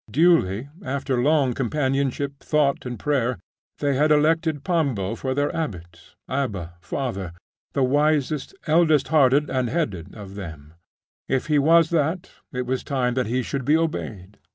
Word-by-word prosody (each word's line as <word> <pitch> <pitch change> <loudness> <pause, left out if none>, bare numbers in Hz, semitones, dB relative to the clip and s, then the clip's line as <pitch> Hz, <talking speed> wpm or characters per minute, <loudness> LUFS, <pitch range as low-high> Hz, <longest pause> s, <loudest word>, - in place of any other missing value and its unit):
Duly, 135 - +3 0.2
after 130 -1 -1
long 140 -2 +3
companionship, 140 +1 -1
thought, 145 -4 +1
and 120 -1 -5
prayer, 130 -4 0 0.4
they 145 -1 0
had 150 +3 +3
elected 155 0 +2
Pambo 140 - 0
for 130 +3 -3
their 145 +1 0
abbot 85 - -6
Abba 100 -11 -3
father 100 -4 -4 0.4
the 135 - +1
wisest, 145 +3 +1
eldest 155 -2 +3
hearted 145 -1 +4
and 130 -2 0
headed 105 - -3
of 100 -3 -9
them 80 -6 -9 0.6
if 135 - 0
he 150 -2 +2
was 165 +3 +5
that, 165 +2 0 0.2
it 125 0 -3
was 130 +1 -2
time 125 -3 0
that 125 -2 0
he 125 +3 0
should 135 +2 -3
be 150 +5 +4
obeyed. 105 - -4
135 Hz, 150 wpm, -23 LUFS, 120-150 Hz, 0.6 s, was